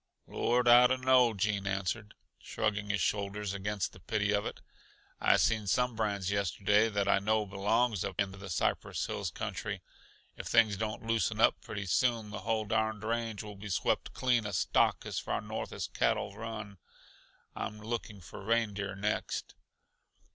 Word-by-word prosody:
"Lord! 120 +1 +1
I 120 +1 +9
dunno," 130 -2 +4
Gene 100 -1 0
answered, 100 +3 -2 0.2
shrugging 105 -1 -2
his 100 -2 0
shoulders 100 0 -1
against 100 -1 -2
the - - -13
pity 105 +3 0
of 105 0 +1
it. - - -7 0.6
"I - - +4
seen 110 -2 +1
some 125 +3 +1
brands 100 -3 -1
yesterday 100 +2 +2
that 100 -2 0
I 100 - +4
know 110 +1 +1
belongs 105 +2 +1
up - - -5
in 100 -1 +1
the 95 0 -9
Cypress 80 - -1
Hills - - -3
country. - - -4 0.5
If - - -7
things 110 -3 +4
don't 110 +2 -4
loosen 115 -3 0
up - - +4
pretty 100 -1 -5
soon, 110 +3 +1
the 110 - -5
whole 110 -1 -1
darned 110 0 0
range 115 -2 -2
will 105 -1 -9
be 105 +2 -8
swept 95 - 0
clean 120 -4 +2
uh 105 - -5
stock 85 - +2
as - - -2
far - - -2
north - - -5
as - - -3
cattle 100 - 0
run. 110 -3 -7 0.8
I'm 105 - -4
looking 110 -2 -5
for 90 - -10
reindeer 105 -3 0
next." 105 +2 -2
105 Hz, 165 wpm, -31 LUFS, 100-115 Hz, 0.8 s, I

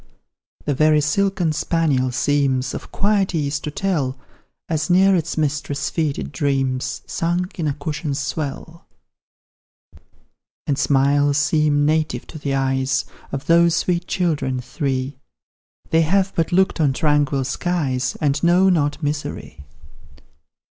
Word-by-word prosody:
The 145 - +1
very 155 +2 +4
silken 180 +2 +1
spaniel 150 -6 +1
seems 135 0 +1
Of - - -7
quiet 200 -3 +1
ease 145 -2 -1
to 150 - -5
tell, 150 -6 -1 0.5
As 155 -1 -1
near 190 +2 +5
its 165 -2 -2
mistress' 145 -1 -1
feet 155 -4 -1
it 70 - -5
dreams, 135 - -1
Sunk 175 +3 -2
in 160 - 0
a 145 - 0
cushion's 145 -1 -3
swell 145 +3 -5 1.8
And 140 -1 -1
smiles 140 +1 +3
seem 150 0 +2
native 155 +1 0
to 155 - -8
the 140 -1 -2
eyes 135 0 0 0.3
Of 140 -1 -4
those 170 0 +4
sweet 175 0 0
children, 145 -8 -1
three; 130 +1 -3 0.7
They 160 - +4
have 190 +4 +1
but 165 -1 0
looked 185 -1 +2
on 140 -3 +3
tranquil 145 -2 +1
skies, 135 -3 -1
And 145 -1 0
know 180 +3 +5
not 150 -3 0
misery. 145 - -4
150 Hz, 130 wpm, -21 LUFS, 140-170 Hz, 1.8 s, near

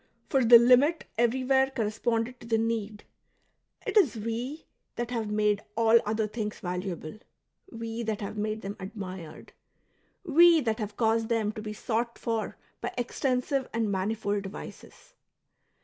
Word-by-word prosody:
For 270 -3 +3
the 235 +1 +10
limit 255 +7 +4
everywhere 260 +3 +2
corresponded 230 0 -1
to 235 - -12
the 225 -1 +2
need; 220 -2 -2 0.8
it - - -3
is 380 - +5
we 235 +7 -4 0.3
that 240 0 -3
have 225 -3 -2
made 210 0 +1
all 230 0 +6
other 215 +1 0
things 210 0 -4
valuable^ 180 0 -5 0.5
we 230 -1 -5
that 220 -2 -2
have 200 +1 -5
made 215 +1 -3
them 195 +1 -4
admired^ 190 -4 -8 0.7
we 340 0 +6
that 225 -3 -1
have 210 -1 -5
caused 225 -1 +1
them 225 -3 +1
to 215 - -7
be 215 0 -5
sought 235 +1 -2
for 225 -2 -3 0.2
by - - -3
extensive 255 +2 -1
and 225 -2 0
manifold 205 +1 -1
devices. 200 - -10
225 Hz, 145 wpm, -28 LUFS, 210-240 Hz, 0.8 s, the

